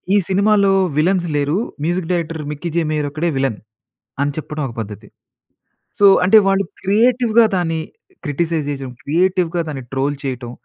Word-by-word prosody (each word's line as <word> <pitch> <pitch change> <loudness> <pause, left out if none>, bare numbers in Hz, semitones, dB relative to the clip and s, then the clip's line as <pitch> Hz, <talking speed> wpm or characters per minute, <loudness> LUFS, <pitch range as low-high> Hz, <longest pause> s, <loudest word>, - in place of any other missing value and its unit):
ఈ - - +6
సినిమాలో 200 +1 +3 0.3
విలన్స్ 175 +3 +2
లేరు. 145 +4 0 0.3
మ్యూజిక్ 175 0 -1
డైరెక్టర్ 165 -2 -2
మిక్కీ 150 +4 -5
జే 170 - +2
మేయర్ 150 -1 -1
ఒక్కడే 160 +4 -1
విలన్ 135 -5 0 0.6
అని 145 0 +1
చెప్పడం 150 -1 -4
ఒక 120 - -10
పద్ధతి. 105 -2 -9 0.9
సో 205 - +5 0.2
అంటే 195 +4 +7
వాళ్ళు 195 0 +2 0.2
క్రియేటివ్‌గా 230 +3 +3
దాన్ని 165 -3 -1 0.5
క్రిటిసైజ్ 160 +1 -1
జేసేయం, 135 -2 -5
క్రియేటివ్‌గా 175 +2 +1
దాన్ని 135 -3 -6
ట్రోల్ 135 +2 0
చేయటం. 125 -3 -4
165 Hz, 145 wpm, -18 LUFS, 145-190 Hz, 0.9 s, అంటే